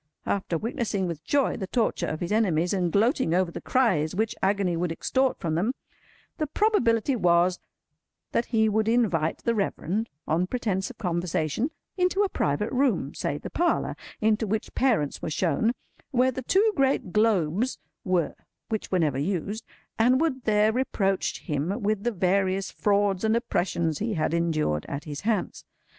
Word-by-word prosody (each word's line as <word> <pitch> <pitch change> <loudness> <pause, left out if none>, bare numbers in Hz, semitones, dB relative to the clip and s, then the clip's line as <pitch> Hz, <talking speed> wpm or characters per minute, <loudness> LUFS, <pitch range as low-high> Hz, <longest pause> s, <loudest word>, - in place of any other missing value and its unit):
After 190 -4 -1
witnessing 215 -1 -2
with 165 -3 -5
joy 280 -2 +1
the 195 -4 -4
torture 230 +2 0
of 155 - -4
his 175 - -3
enemies, 180 -6 +2
and 180 -3 0
gloating 220 - +2
over 180 -1 +1
the - - -7
cries 185 - +1
which 220 +2 0
agony 195 -2 +1
would 170 0 -1
extort 260 +9 0
from 165 -2 -2
them, 205 +11 0 0.6
the 305 - 0
probability 275 - +2
was 180 -3 +3 0.7
that 235 - +1
he 220 -2 +2
would 215 0 +1
invite 205 -10 +1
the 235 - +2
Reverend, 205 0 -1 0.2
on 170 +4 +1
pretence 195 -5 -1
of 255 - -11
conversation, 175 - -1 0.3
into 365 +2 +2
a 400 - 0
private 150 - -1
room—say 235 - 0
the - - -8
parlour 345 0 0 0.2
into 220 0 +2
which 215 +2 -2
Parents 225 - +1
were - - -3
shown, 175 +7 +1 0.4
where 260 0 +3
the 260 - -5
two 405 - +3
great 270 -9 +1
globes 210 +1 +2 0.3
were 180 -5 +1 0.4
which 220 -2 -3
were 185 - +3
never 150 -6 +1
used—and 210 - -1
would 270 -6 -1
there 215 0 +4
reproach 200 -6 0
him 160 - -2
with 210 0 0
the 240 - +1
various 190 0 +1
frauds 200 -2 +1
and 220 0 +3
oppressions 170 -8 0
he 220 0 -1
had 155 0 0
endured 155 - 0
at 140 0 -4
his 145 -2 -6
hands. 215 -2 -1
200 Hz, 160 wpm, -26 LUFS, 170-235 Hz, 0.7 s, there